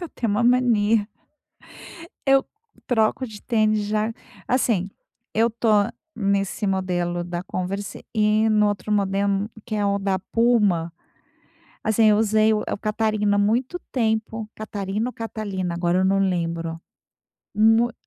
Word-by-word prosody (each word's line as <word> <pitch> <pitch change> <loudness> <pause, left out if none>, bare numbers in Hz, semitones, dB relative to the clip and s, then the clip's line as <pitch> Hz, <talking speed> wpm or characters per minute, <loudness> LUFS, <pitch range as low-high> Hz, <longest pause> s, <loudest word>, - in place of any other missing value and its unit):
Eu 345 - -6
tenho 230 -3 -2
uma 210 +3 +1
mania 230 -4 +3 1.2
Eu 270 0 +5 0.4
troco 235 +2 +1
de 215 -3 -11
tênis 215 -3 +1
já 215 +2 0 0.3
assim, 225 -7 +1 0.4
eu 230 +2 +3
tô 230 +1 -2 0.5
nesse 200 0 -1
modelo 175 -2 -1
da 175 0 -4
Converse 195 +2 -5
e 215 0 +3
no 210 -1 +3
outro 205 +1 -3
modelo, 200 0 +1 0.2
que 225 - -5
é 210 -1 0
o 200 0 +1
da 195 -1 0
Puma. 205 -6 +1 0.9
Assim, 220 +1 +3
eu 210 -1 +5
usei 220 0 +3
o 210 - -1
é - - -3
o - - -3
Catarina 215 -1 0
muito 240 +11 +1
tempo. 220 -2 -1
Catarina 210 +1 -3
ou - - -10
Catalina, 200 -5 -4
agora 175 +1 +1
eu 190 - +2
não 195 +1 +2
lembro. 170 -3 -1 0.8
Mui 225 +3 +4
210 Hz, 140 wpm, -23 LUFS, 195-225 Hz, 1.2 s, Eu